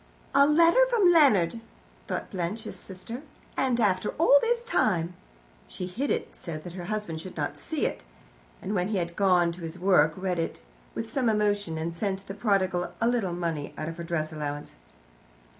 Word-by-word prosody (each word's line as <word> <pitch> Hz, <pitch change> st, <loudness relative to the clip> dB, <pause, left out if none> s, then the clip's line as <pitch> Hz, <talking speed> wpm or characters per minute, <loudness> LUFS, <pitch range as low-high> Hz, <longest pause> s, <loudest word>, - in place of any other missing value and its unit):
"A 280 Hz, +1 st, +6 dB
letter 335 Hz, +10 st, +6 dB
from 420 Hz, -7 st, +5 dB
Leonard," 235 Hz, -, +4 dB, 0.5 s
thought -, -, -4 dB
Blanche, 190 Hz, +4 st, -3 dB
his -, -, -7 dB
sister; 215 Hz, +7 st, -8 dB, 0.3 s
"and 255 Hz, -3 st, +1 dB
after 200 Hz, -2 st, +2 dB
all 285 Hz, -2 st, +6 dB
this 475 Hz, 0 st, +1 dB
time." 180 Hz, -, +1 dB, 0.5 s
She 180 Hz, -, -6 dB
hid 235 Hz, +11 st, -3 dB
it, -, -, -2 dB
so 165 Hz, -2 st, -6 dB
that 170 Hz, +3 st, -9 dB
her 180 Hz, -1 st, -6 dB
husband 200 Hz, -6 st, -3 dB
should 185 Hz, +2 st, -9 dB
not -, -, -2 dB
see, -, -, -2 dB, 0.8 s
and 200 Hz, -, -2 dB
when 180 Hz, -2 st, +1 dB
he 210 Hz, -1 st, -1 dB
had 170 Hz, -1 st, -2 dB
gone 180 Hz, -4 st, +3 dB
to 175 Hz, +1 st, -10 dB
his 165 Hz, +1 st, -6 dB
work 175 Hz, -5 st, +4 dB
read 185 Hz, -2 st, -1 dB
it 165 Hz, -, -3 dB, 0.3 s
with 225 Hz, 0 st, -5 dB
some 255 Hz, -4 st, +2 dB
emotion, 205 Hz, -5 st, +1 dB
and 165 Hz, +1 st, -3 dB
sent 195 Hz, +2 st, -3 dB
the 195 Hz, -, -6 dB
prodigal 195 Hz, -4 st, 0 dB
a 230 Hz, -, +2 dB
little 230 Hz, -7 st, +1 dB
money 165 Hz, -4 st, -3 dB
out 155 Hz, -, -3 dB
of 165 Hz, -, -7 dB
her 170 Hz, -, -5 dB
dress 160 Hz, -2 st, -2 dB
allowance. 145 Hz, -1 st, -4 dB
190 Hz, 185 wpm, -27 LUFS, 170-230 Hz, 0.8 s, A